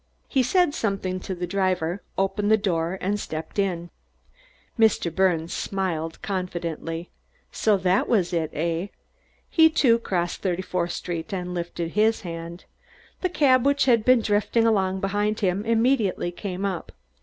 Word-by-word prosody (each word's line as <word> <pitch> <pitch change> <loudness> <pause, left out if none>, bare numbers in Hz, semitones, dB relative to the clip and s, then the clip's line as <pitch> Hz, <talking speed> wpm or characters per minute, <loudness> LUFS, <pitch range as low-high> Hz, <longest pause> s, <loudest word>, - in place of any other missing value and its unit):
He 270 - +2
said 340 +5 +2
something 195 -5 -2
to 190 +1 -5
the 180 0 -3
driver, 185 -1 -1 0.2
opened 195 +2 0
the 220 - +6
door 180 -3 -1
and 205 +2 0
stepped 160 +2 -5
in. 175 -3 -1 0.9
Mr. 215 -7 +3
Birnes 170 -3 +1
smiled 165 -5 -3
confidently. 170 -3 -4 0.4
So 215 -2 +2
that 185 +1 +1
was 185 -6 +2
it, 160 -2 0
eh? 170 +4 -2 0.6
He, 320 -1 +5
too, 250 -7 +3
crossed 175 -6 -2
Thirty 185 -1 -1
fourth 175 -2 -2
Street 170 0 -5
and 180 -2 -3
lifted 170 -1 -4
his 220 +3 +2
hand. 170 -1 -7 0.6
The 370 - +1
cab 265 -7 +4
which 280 0 +3
had 235 -4 +4
been 255 0 +5
drifting 210 +2 +1
along 190 -4 +1
behind 205 +2 0
him 190 0 +1
immediately 225 -6 +1
came 190 +1 -4
up. 190 -4 -3
190 Hz, 150 wpm, -25 LUFS, 175-215 Hz, 0.9 s, the